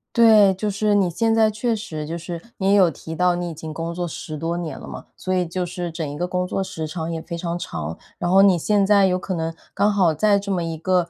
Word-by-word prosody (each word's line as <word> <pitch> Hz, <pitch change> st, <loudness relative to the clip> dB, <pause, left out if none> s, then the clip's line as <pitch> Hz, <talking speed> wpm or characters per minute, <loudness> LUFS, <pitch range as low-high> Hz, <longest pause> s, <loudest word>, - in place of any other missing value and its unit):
对， 215 Hz, -4 st, +7 dB
就 210 Hz, +3 st, -2 dB
是 210 Hz, +1 st, +1 dB
你 195 Hz, -3 st, +3 dB
现 225 Hz, +6 st, +1 dB
在 220 Hz, -1 st, +4 dB
确 225 Hz, +2 st, -1 dB
实 155 Hz, -8 st, -6 dB
就 165 Hz, +2 st, -4 dB
是 170 Hz, 0 st, -6 dB
你 195 Hz, -2 st, 0 dB
也 -, -, +5 dB
有 190 Hz, -4 st, +6 dB
提 160 Hz, +1 st, -8 dB
到 180 Hz, 0 st, +3 dB
你 175 Hz, 0 st, -3 dB
已 -, -, -6 dB
经 155 Hz, 0 st, -7 dB
工 165 Hz, +1 st, -4 dB
作 175 Hz, 0 st, -3 dB
10 155 Hz, -1 st, -6 dB
多 165 Hz, +2 st, -2 dB
年 170 Hz, -3 st, -5 dB
了 -, -, -10 dB
嘛， -, -, -9 dB
所 185 Hz, -, -2 dB
以 180 Hz, -1 st, +1 dB
就 180 Hz, +2 st, -3 dB
是 175 Hz, 0 st, -5 dB
整 160 Hz, -1 st, -4 dB
一 145 Hz, -, -6 dB
个 175 Hz, -, -1 dB
工 180 Hz, 0 st, -2 dB
作 195 Hz, -, -1 dB
时 160 Hz, -4 st, -5 dB
长 160 Hz, +1 st, -4 dB
也 165 Hz, -1 st, -4 dB
非 170 Hz, -, -6 dB
常 170 Hz, 0 st, -3 dB
长。 80 Hz, -, -5 dB, 0.2 s
然 175 Hz, -, -1 dB
后 195 Hz, -, +7 dB
你 195 Hz, -3 st, +5 dB
现 200 Hz, +4 st, +2 dB
在 200 Hz, -2 st, +5 dB
有 180 Hz, 0 st, +1 dB
可 185 Hz, -, -4 dB
能 165 Hz, -1 st, -2 dB, 0.2 s
刚 205 Hz, +1 st, +2 dB
好 185 Hz, -5 st, +3 dB
在 200 Hz, +6 st, +3 dB
这 200 Hz, 0 st, -7 dB
么 180 Hz, -3 st, 0 dB
一 165 Hz, -1 st, -4 dB
个， 180 Hz, +1 st, +1 dB
180 Hz, 290 characters per minute, -22 LUFS, 165-200 Hz, 0.2 s, 对